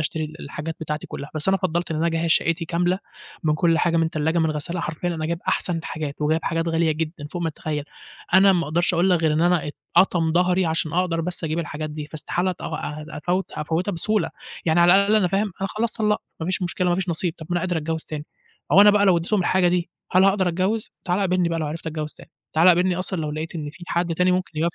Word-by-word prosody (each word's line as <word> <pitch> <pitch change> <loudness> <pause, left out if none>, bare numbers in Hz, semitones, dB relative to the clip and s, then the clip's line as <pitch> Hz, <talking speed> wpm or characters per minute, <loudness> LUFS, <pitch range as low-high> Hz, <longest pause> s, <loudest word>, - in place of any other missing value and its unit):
اشتري 155 +1 -1
ال 155 +2 -9
الحاجات 155 +3 -6
بتاعتي 150 -1 -4
كلها، 140 - -7
بس 155 +4 +2
أنا 195 - +4
فضَّلت 175 -3 -2
إن 155 - -1
أنا 165 +2 +1
أجَهِّز 165 0 0
شقّتي 165 +1 +2
كاملة، 175 +3 0 0.5
من 150 -1 +3
كل 165 +1 +2
حاجة 170 -1 +2
من 165 0 +2
تلّاجة، 160 +2 0
من 160 -1 +2
غسّالة 170 +4 -3
حرفيًا 160 +3 -3
أنا 160 -2 -2
جايب 170 0 -2
أحسن 175 -2 +1
الحاجات، 155 -3 -5
وجايب 160 +2 +2
حاجات 165 0 -1
غالية 165 -1 +2
جدًا، 155 -1 -4
فوق 175 -1 -3
ما 165 - 0
تتخيل. 150 -1 -4 0.5
أنا 195 +1 +7
ما 175 -3 +1
أقدرش 170 +4 +1
أقول 175 +3 +3
لك 175 -2 +3
غير 155 -1 +3
إن 155 - +1
أنا 175 -4 +2 0.3
اتقطم 165 -4 +4
ضهري، 180 +1 +2
عشان 160 -1 -1
أقدر 175 -1 +1
بس 175 0 -3
أجيب 160 +1 -1
الحاجات 155 -2 -4
دي، 150 -1 -6
فاستحالة 175 +4 -2
أت 180 - -8
آآ 150 -1 -5
أفوّت 180 +5 -1
أفوّتها 165 +6 -2
بسهولة، 195 +1 0 0.3
يعني 170 +1 +3
على 175 +1 +7
الأقل 200 +2 +4
أنا 185 -4 +3
فاهم، 195 +1 0
أنا 195 - -1
خلاص 230 +1 0
طلَّقت، 210 -2 0 0.2
ما 160 - -3
فيش 185 0 -1
مشكلة، 180 +1 -1
ما 175 - +3
فيش 190 0 -2
نصيب. 170 0 -1
طَب 160 - -9
ما - - 0
أنا 175 - +1
قادر 180 -2 -1
أتجوِّز 160 +1 -3
تاني، 150 -1 -6 0.5
هو 195 - +8
أنا 205 0 +9
بقى 205 0 +3
لو 180 -2 +5
اديتهم 185 +4 0
الحاجة 180 0 +3
دي، 175 -1 0 0.2
هل 185 +1 +6
هاقدر 195 -2 +3
أتجوِّز، 190 +6 -1
تعالَ 180 +2 0
قابلني 180 -2 +2
بقى 165 0 -1
لو 155 - -1
عِرِفت 160 +2 -6
أتجوِّز 155 -1 -4
تاني. - - -16 0.2
تعالَ 165 +3 +6
قابلني 180 0 +4
أصلًا 185 -2 -2
لو 150 -1 -2
لقيت 155 +3 -5
إن 150 -2 -4
فيه 175 - -12
حد 170 -1 0
تاني 180 +2 +3
ممكن 180 -4 -2
يوافق 170 +1 0
170 Hz, 245 wpm, -23 LUFS, 160-180 Hz, 0.5 s, أنا